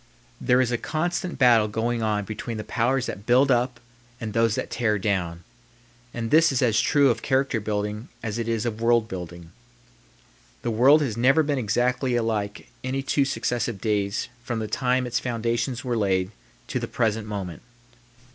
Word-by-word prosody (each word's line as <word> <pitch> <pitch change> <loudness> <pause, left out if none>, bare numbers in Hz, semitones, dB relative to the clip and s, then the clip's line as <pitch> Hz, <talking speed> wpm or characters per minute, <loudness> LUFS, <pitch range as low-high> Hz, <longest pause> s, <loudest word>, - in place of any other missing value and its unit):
There 125 +1 +4
is 125 -2 0
a 120 - 0
constant 175 +3 -2
battle 120 -5 +5
going 115 +2 -1
on 105 -2 0
between 110 +2 -5
the 105 - -4
powers 125 +4 0
that 100 - -7
build 130 +3 +5
up 120 0 +1 0.4
and 110 -3 -5
those 115 -1 +2
that - - -4
tear 110 -3 +1
down; 90 -4 -2 0.7
and 115 -1 -4
this 160 +1 +6
is 130 -1 +1
as 115 -3 +3
true 140 -3 +4
of 115 -1 -3
character 135 -3 +1
building 105 +1 -3 0.2
as 115 0 -3
it 115 - -2
is 115 0 -1
of 115 -1 -3
world 115 -1 +3
building. 85 -3 -8 1.1
The 120 - -1
world 135 +7 +5
has 115 -6 -3
never 135 +6 +4
been 145 -2 0
exactly 125 +3 0
alike 110 -3 -2
any 135 +1 -2
two 140 +1 +2
successive 120 -3 -2
days 100 -1 -1 0.2
from 120 -2 -3
the 110 -1 -3
time 125 +3 0
its 120 -1 -1
foundations 120 +1 -2
were 125 -1 0
laid 95 -3 +1 0.4
to - - -1
the - - -4
present 110 -2 -1
moment. 95 -6 -5
115 Hz, 175 wpm, -25 LUFS, 105-125 Hz, 1.1 s, this